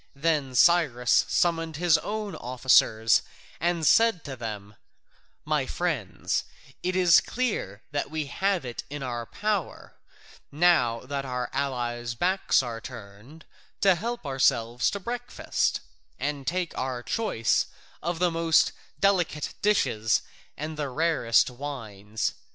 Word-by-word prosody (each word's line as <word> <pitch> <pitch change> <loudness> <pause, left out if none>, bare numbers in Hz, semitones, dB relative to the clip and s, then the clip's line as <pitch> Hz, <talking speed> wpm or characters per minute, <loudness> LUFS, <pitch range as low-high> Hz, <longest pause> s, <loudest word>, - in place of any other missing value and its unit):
Then 145 -3 0
Cyrus 140 -8 +4
summoned 165 -2 +1
his 170 +1 +3
own 210 -3 -4
officers 120 -4 +3 0.4
and 170 0 0
said 225 -2 +4
to 135 - -5
them: 105 -4 -7 0.7
"My 150 -3 0
friends, 160 - -2 0.4
it 185 +1 -1
is 180 -3 +6
clear 210 - -3
that 145 -1 -2
we 155 0 -3
have 190 +1 -1
it 120 -1 -5
in 145 -1 -5
our 120 -2 -4
power, 210 -5 -3 0.6
now 145 -8 +3
that 140 +1 -4
our 125 -2 -4
allies' 120 -3 -2
backs 185 0 +2
are 115 -2 -5
turned, 115 +6 -11 0.4
to 195 -2 +6
help 230 +3 -4
ourselves 120 -3 +2
to 200 - -4
breakfast, 240 +4 -2 0.4
and 145 -2 -3
take 180 0 -1
our 130 -2 -3
choice 195 - 0 0.3
of 170 +1 -2
the 175 0 +2
most 165 -1 +3 0.3
delicate 180 -7 +1
dishes 110 - +2 0.3
and 155 +1 -5
the 145 -2 -2
rarest 145 -5 +2
wines. 110 -6 -4
145 Hz, 125 wpm, -27 LUFS, 120-175 Hz, 0.7 s, is